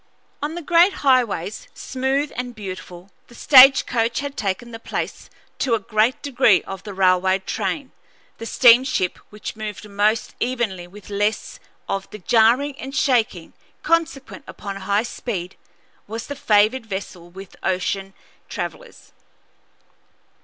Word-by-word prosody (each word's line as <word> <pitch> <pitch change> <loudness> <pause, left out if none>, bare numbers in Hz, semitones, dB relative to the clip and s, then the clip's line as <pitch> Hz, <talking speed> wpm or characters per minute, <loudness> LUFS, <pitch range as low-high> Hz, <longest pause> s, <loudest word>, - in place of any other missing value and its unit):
On 300 +3 -3
the 345 - -6
great 345 +4 +4
highways, 235 -8 +1
smooth 270 +3 -2
and 245 -1 -5
beautiful, 185 -2 -9 0.2
the 240 - -16
stage 270 +1 +7
coach 230 -1 0
had 285 -1 -5
taken 215 +2 -3
the 225 - -8
place - - -5 0.3
to 245 -4 +2
a - - -2
great 215 +4 0
degree 255 -8 +3
of 195 -1 -8
the 205 -1 -8
railroad 190 0 +2
train; 260 +7 -3 0.5
the 230 - -6
steamship, 240 -7 +4
which 210 0 -7
moved 215 -1 -7
most 210 +2 0
evenly 235 -8 -2
and 175 - -19
with 210 0 -13
less 205 +2 -2 0.3
of 195 0 -3
the - - -9
jarring 235 +8 +3
and 270 +1 -7
shaking 225 -11 0 0.3
consequent 315 -3 -1
upon 200 -1 -7
high 200 +2 0
speed, 195 -6 -5 0.5
was 225 +3 -6
the 285 - -6
favored 225 0 +2
vessel 190 -3 -7
with 190 +1 -12
ocean 195 +1 -2 0.3
travellers. - - -7
220 Hz, 140 wpm, -21 LUFS, 195-260 Hz, 0.5 s, stage